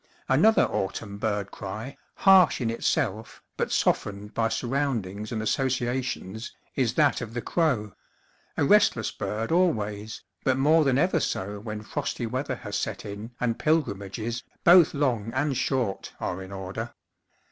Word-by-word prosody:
Another 220 +1 +5
autumn 100 +1 -3
bird 105 -2 -1
cry, 110 +7 -6 0.2
harsh 190 -3 +6
in 115 -3 0
itself, 115 -2 -1
but - - -2
softened 105 +1 0
by 115 -1 +1
surroundings 115 -6 -2
and 110 -2 -2
associ 125 +1 0
ations, 115 -4 -4 0.3
is 125 -4 +1
that 150 -4 +3
of 115 -1 -7
the 120 - -1
crow 125 - 0 0.6
a 145 - +3
restless 200 - +4
bird 105 +5 -3
always, 110 - 0 0.2
but 130 -1 +2
more 155 +4 +5
than 135 -3 +2
ever 175 +2 +3
so 100 -6 -2
when 105 0 -6
frosty 135 0 -3
weather 130 +3 -2
has 105 -4 -6
set - - -3
in 105 +2 -6
and 115 -2 -1
pilgrimages, 115 -6 -1 0.2
both 175 -3 +7
long 120 -6 0
and 140 +1 +1
short, 125 -5 -1
are 90 +1 -3
in 95 0 -9
order. 100 +4 -6
115 Hz, 145 wpm, -26 LUFS, 105-140 Hz, 0.6 s, both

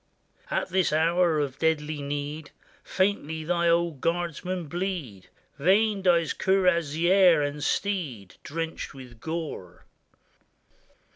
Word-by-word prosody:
At - - -1
this 185 -1 +1
hour 165 +1 +2
of 140 -2 -3
deadly 155 -2 0
need 145 +1 -4 0.3
Faintly 175 -5 -1
thy 170 +1 +1
old 170 -4 +1
guardsmen 175 +1 -2
bleed; 165 - -4 0.3
Vain 200 +6 +3
dies 170 -3 +3
cuirassier 175 -2 +3
and 145 0 -3
steed, 145 - -2
Drenched 165 +1 -5
v/ith 125 -4 -12
gore. 160 - -6
165 Hz, 100 wpm, -26 LUFS, 145-180 Hz, 0.3 s, Vain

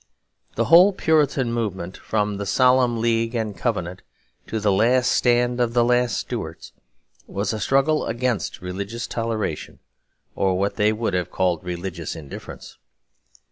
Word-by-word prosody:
The 115 - +1
whole 180 - +7
Puritan 145 -8 +1
movement, 95 -6 -3
from 105 -2 -2
the 100 0 -4
Solemn 125 +2 +3
League 115 +1 0
and 110 -3 -2
Covenant 90 -3 -3 0.5
to 110 - -2
the 105 -1 +2
last 120 +6 +3
stand 120 0 +2
of 120 0 0
the 120 - +5
last 120 -3 +2
Stuarts, - - -6 0.5
was 100 +2 -2
a 110 - -3
struggle 135 +7 +2
against 120 -1 -2
religious 100 +6 -5
toleration, 115 -8 -3 0.6
or 95 -1 +1
what 100 +2 -1
they 105 0 +3
would 110 -2 -2
have 90 -1 -1
called 90 -2 0
religious 90 -1 -5
indifference. 75 -4 -10
115 Hz, 140 wpm, -23 LUFS, 95-120 Hz, 0.6 s, whole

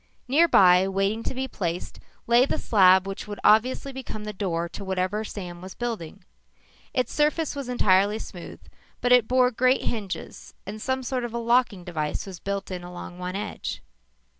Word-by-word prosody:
Nearby, 195 - +5
waiting 195 +3 0
to 255 - -4
be 265 +1 -2
placed, 175 -7 -4 0.3
lay 240 +3 +5
the - - -1
slab 190 -3 +5
which 195 +1 -6
would 205 -1 -6
obviously 255 +5 +3
become 255 -5 -7
the 210 0 -5
door 170 -4 -2
to 200 - -8
whatever 190 +2 -1
Sam 180 -5 -7
was 185 +1 -9
building. 225 -10 -5 0.7
Its 250 -2 -1
surface 300 +1 +1
was 275 -3 -5
entirely 205 -3 +3
smooth, 180 -5 -9 0.4
but 245 - 0
it 250 -3 +6
bore 255 0 +3
great 255 +2 +2
hinges 205 -5 -5
and 210 +2 -7
some 260 +2 -1
sort 255 0 -2
of 235 -1 -5
a - - 0
locking 235 -5 +2
device 155 -4 -3
was 190 -3 -9
built 200 0 -4
in 180 -1 -5
along 175 0 -9
one 180 +1 -4
edge. 205 - -5
210 Hz, 175 wpm, -25 LUFS, 185-250 Hz, 0.7 s, it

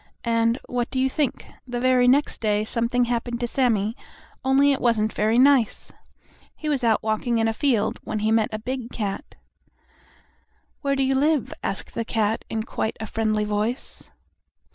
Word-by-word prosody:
And, 230 0 +2
what 245 -1 -2
do 260 - -2
you 260 - +3
think? 295 -3 -1 0.2
The 245 -1 -3
very 250 0 +3
next 280 +4 +2
day 210 -1 +1
something 235 +2 +1
happened 240 0 -2
to 240 - -1
Sammie, 230 -4 +1 0.5
only 270 +2 +4
it 275 - -1
wasn't 220 -3 +1
very 215 +2 +1
nice. 260 -3 +3 0.6
He 310 - -7
was 285 -4 0
out 225 -2 +2
walking 220 +2 0
in 225 0 +2
a 225 - 0
field, 240 -4 0
when 215 - -3
he 215 +1 0
met 225 -1 +3
a 215 - -3
big 245 +2 -5
cat. 205 -4 -4 1.5
"Where 275 -1 0
do 270 - +1
you 265 0 +2
live?" 290 0 +1
asked 195 - -4
the 230 - -2
cat, 220 -1 0
in 220 -1 -2
quite 220 -1 -3
a 220 - -4
friendly 215 -1 0
voice. 210 +4 -3
235 Hz, 175 wpm, -24 LUFS, 220-260 Hz, 1.5 s, only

